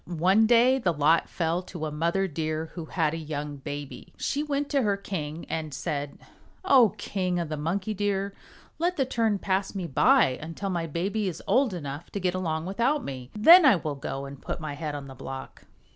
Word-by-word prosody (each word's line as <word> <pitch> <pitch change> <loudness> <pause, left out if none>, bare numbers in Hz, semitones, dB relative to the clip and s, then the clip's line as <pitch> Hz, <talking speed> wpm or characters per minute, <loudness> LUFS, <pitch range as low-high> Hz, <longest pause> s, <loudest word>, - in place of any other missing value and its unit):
One 185 +6 +3
day 245 +3 +5
the 185 -8 +1
lot 155 +2 +3
fell 170 +1 -1
to 175 -3 -6
a 155 - -3
mother 170 +6 0
Deer 155 0 -3
who 170 -3 -6
had 160 -2 0
a - - -3
young 150 -2 -5
baby. 145 0 -8
She 290 - -1
went 290 -1 -1
to 280 -2 +2
her 205 -4 +1
king 165 -5 -5
and 155 -3 -4
said, 145 +1 -3 0.5
"O 245 - +5
King 185 -3 -2
of 170 -3 -2
the 155 - -2
Monkey 185 +8 -2
Deer, 200 -1 -1 0.5
let 350 +2 0
the 270 - +2
turn 225 -4 +1
pass 195 +1 -1
me 190 -2 -3
by 130 -3 +4
until 165 +5 -4
my 170 -2 -2
baby 195 +7 -1
is 180 - -5
old 260 -3 +3
enough 145 0 -6
to 200 - -2
get 180 -1 0
along 165 -3 -2
without 240 +10 0
me. 130 -2 -7
Then 335 - +9
I 265 -7 +7
will 155 -4 -3
go 135 0 -5
and 140 0 -10
put - - -4
my 155 -2 -5
head 150 0 -4
on 145 -1 -6
the 135 - -10
block." 135 +1 -8
170 Hz, 205 wpm, -27 LUFS, 150-205 Hz, 0.5 s, Then